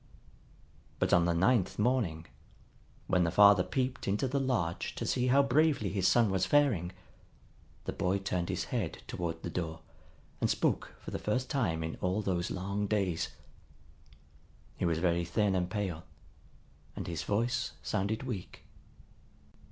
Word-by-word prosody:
But - - +1
on 85 -1 +5
the 85 - +2
ninth 95 +3 +2
morning, 105 -9 0 0.8
when 90 -1 +2
the 85 - +2
father 100 +1 +7
peeped 130 +6 -2
into 105 +7 +1
the 140 +2 0
lodge 115 -11 -1
to - - -4
see 125 0 +1
how 140 +3 +5
bravely 140 - +2
his 95 -2 +1
son 115 -4 +4
was 95 -1 +1
faring, 125 - +3 0.9
the - - -3
boy 95 0 0
turned 90 -3 -2
his - - -1
head - - -2
toward 80 -2 -4
the - - -3
door 80 -2 -4 0.6
and - - +2
spoke - - 0
for - - -8
the - - -3
first 125 +5 -1
time 85 -12 0
in 80 - -4
all 95 +4 0
those 90 -2 -1
long 100 +2 -2
days. 95 -5 0 1.5
He - - -2
was 85 -2 +1
very 85 0 +1
thin 100 +3 +1
and 90 -1 0
pale, 95 -5 -3 0.9
and - - -5
his 85 -3 -3
voice 120 +4 -1
sounded 105 +3 -1
weak. 105 -8 -6
95 Hz, 150 wpm, -31 LUFS, 85-120 Hz, 1.5 s, father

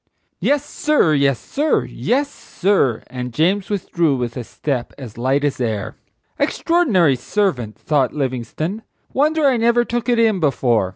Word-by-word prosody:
"Yes, 290 0 +1
sir; 295 - +2
yes, 140 -3 +2
sir; 295 - 0
yes, 280 +4 -1
sir;" 190 - 0
and 125 -1 -6
James 180 - +1
withdrew 170 -7 0
with 120 -1 -3
a 125 - -4
step 130 +1 -4
as 125 -6 -9
light 130 +4 0
as 145 -3 -1
air. 110 -4 -2 0.4
"Extraordinary 220 - +2
servant!" 125 - -1
thought 140 -5 +1
Livingstone. 145 - -3 0.3
"Wonder 305 +2 +2
I 265 -3 +4
never 235 +1 +3
took 240 +1 -2
it 240 - +3
in 220 -4 +3
before!" 120 - +1
155 Hz, 150 wpm, -19 LUFS, -, 0.4 s, I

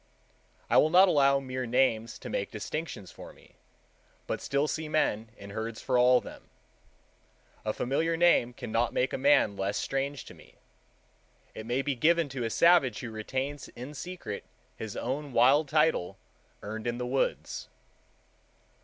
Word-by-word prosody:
I - - +3
will 155 - +5
not 185 +4 +7
allow 140 -4 +4
mere 130 -2 -4
names 115 -2 +1
to - - -9
make 100 - -2
distinctions 115 - -6
for - - -12
me, - - -22 0.7
but - - -3
still 140 +2 0
see 155 0 -3
men 115 -8 0
in 100 0 -10
herds 110 +2 -5
for 130 - -1
all 125 0 +6
them. - - -12 1.1
A 110 - 0
familiar 160 +9 -1
name 170 -8 +4
cannot 115 0 -1
make 130 - +1
a - - 0
man 135 -7 +4
less 100 +1 -2
strange 135 0 -3
to - - -11
me. - - -18 1.0
It 110 - -8
may 125 +3 0
be 145 - 0
given 160 +4 +2
to 130 -2 -4
a 115 - -1
savage 165 -5 +4
who 120 - -6
retains 130 +6 -4
in 125 +5 -9
secret 170 - -6 0.3
his 110 -2 -7
own 140 +3 -4
wild 135 +6 +4
title 155 - +1 0.5
earned 110 +3 -5
in 120 0 -1
the 125 - -3
woods. 130 +2 -2
130 Hz, 160 wpm, -29 LUFS, 115-145 Hz, 1.1 s, not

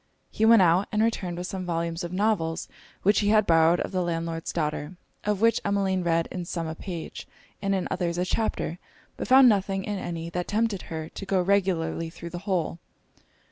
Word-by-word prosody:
He 220 - +1
went 225 -3 +7
out, 175 +3 +3
and 215 0 +2
returned 185 -6 -1
with 180 - -4
some 190 0 -4
volumes 170 0 -2
of 170 - -5
novels, 185 -5 0 0.4
which 205 +2 +4
he 205 - 0
had 215 0 +4
borrowed 165 0 +4
of - - -4
the 185 -1 0
landlord's 165 -1 -3
daughter; 150 +1 -2 0.3
of 210 -1 0
which 230 0 +4
Emmeline 195 -2 +1
read 165 -1 +1
in 180 - -4
some 170 -1 -4
a 160 - -4
page, 170 0 -7 0.3
and 195 -1 +1
in 190 - -1
others 175 -2 -1
a 180 - 0
chapter, 185 -4 -2 0.4
but - - -5
found 260 0 +8
nothing 195 -3 +2
in 205 -1 -3
any, 170 -1 -5
that 180 0 -3
tempted 215 -2 0
her 160 -1 -4
to 195 - -8
go 195 -1 +2
regularly 180 -3 +1
through 170 0 -9
the 175 - -5
whole. 175 -2 -1
180 Hz, 200 wpm, -26 LUFS, 165-200 Hz, 0.4 s, found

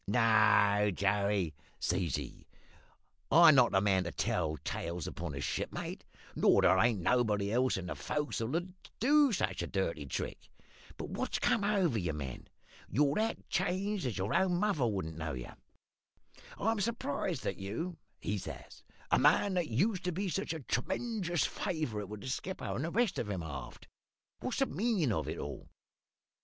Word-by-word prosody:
"`No, 105 -2 +4
Joey,' 100 -3 +1 0.3
says 90 -2 0
he, 70 -4 -7 0.8
`I'm 165 +1 +9
not 125 -3 +5
the 95 - +3
man 95 -3 +2
to 85 - -3
tell 80 -1 -1
tales 85 -1 -3
upon 85 -4 -5
a 70 - -4
shipmate; - - -3 0.3
nor - - +4
there 95 - +5
ain't 115 -2 +3
nobody 105 -2 +2
else 125 -1 +2
in 95 - -5
the 90 - -3
fo'c's'le 145 -3 -2
as'll 175 +2 -3 0.3
do 290 +3 +5
such 95 - -1
a 85 - -3
dirty 85 -6 -2
trick. - - -5 0.5
But - - -6
what's - - -2
come 215 - +2
over 190 - +2
ye, 85 -3 -1
man? 70 -4 -6 0.4
You're 145 0 +3
that 220 +5 -1
changed 190 -2 -1
as 115 - -3
your 95 +2 -1
own 185 0 +3
mother 175 - +1
wouldn't 80 -7 -3
know 80 -2 -3
ye. 60 -2 -6 1.1
I'm 225 0 0
surprised 185 - -2
at 100 - -2
you,' 135 - -4 0.2
he 105 0 -2
says - - -9 0.3
`a - - +5
man 160 +8 +4
that 175 -3 0
used 180 - +1
to 180 - +1
be 190 +3 -2
such 195 +4 -2
a 160 -2 -4
tremenjous 175 - -1
favourite 110 - -3
with 105 -1 -7
the 130 - -5
skipper 185 +8 -4
and 135 - -2
the - - -2
rest 230 +2 +1
of 105 - -3
'em 95 -4 -3
aft. 70 -5 -8 0.5
What's - - -3
the - - +3
meanin' 185 - 0
of - - -1
it - - -4
all?' - - -7
120 Hz, 170 wpm, -32 LUFS, -, 1.1 s, `I'm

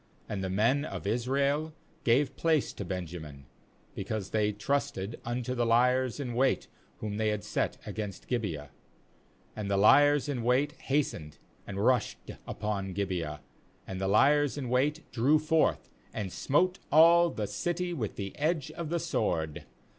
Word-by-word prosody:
And 100 -2 -3
the 95 - -2
men 115 +9 +2
of 155 - -6
Israel 140 +7 0 0.3
gave 135 +3 +2
place 160 -2 +1
to - - -6
Benjamin, 85 -6 -6 0.5
because 100 0 -4
they 105 -1 +2
trusted 110 -1 -2
unto 120 +1 -2
the 120 -1 0
liers 125 +2 +2
in 125 -4 -3
wait 130 +3 +1 0.3
whom 105 -1 -3
they 110 0 +1
had 105 -1 -1
t - - -10
set - - -1
against 105 -3 -6
Gibeah. 85 - -3 0.4
— - - -34
37And 105 -2 -4
the 100 0 +1
liers 145 +8 +5
in 135 -4 -2
wait 125 +5 +2
has 140 +1 0
tened, 75 -2 -10 0.3
and 100 +2 -2
rushed 130 -1 +1 0.2
upon 100 -3 -3
Gibeah; 90 -6 -3 0.4
and 95 0 -6
the 95 - 0
liers 145 +8 +4
in 130 -4 -4
wait 145 +6 +1
drew 135 +6 +3
forth, 155 +1 +1 0.2
and 100 -4 -4
smote 180 +7 +1
all 170 +3 +7
the 110 -9 -3
city 175 - -2
with 115 - -3
the 100 -1 -5
edge 155 -1 0
of 170 -3 -5
the 170 +1 0
sword. 80 - -1
120 Hz, 160 wpm, -30 LUFS, 100-145 Hz, 0.5 s, all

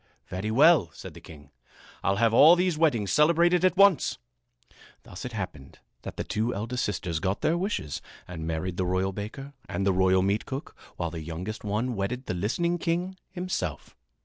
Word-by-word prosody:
"Very 95 +4 -4
well," 140 - +5
said - - -9
the - - -13
king. 75 -3 -14 0.5
"I'll 95 - +1
have 115 +2 +2
all 155 +8 +8
these 180 -1 +1
weddings 135 -11 +1
celebrated 170 +3 +4
at 185 0 +3
once." 200 -4 +4 0.9
Thus 90 - -9
it 125 - -5
happened 90 -10 -6 0.2
that - - -8
the - - -2
two 115 +3 -1
eldest 115 +5 -2
sisters 85 -5 -2
got 95 +3 -2
their 160 - +2
wishes 175 - -3 0.3
and 80 -2 -6
married 80 +2 -3
the 95 - 0
royal 95 +1 0
baker 115 +8 -7 0.2
and 100 - -2
the 100 - +3
royal 95 0 +3
meatcook, 110 - -2 0.2
while 85 -2 -2
the 80 -1 -6
youngest 85 +7 -6
one 110 +4 -1
wedded 120 +6 -3
the - - -3
listening 170 - -1
king 175 +3 -1
himself. 180 - -4
110 Hz, 175 wpm, -27 LUFS, -, 0.9 s, all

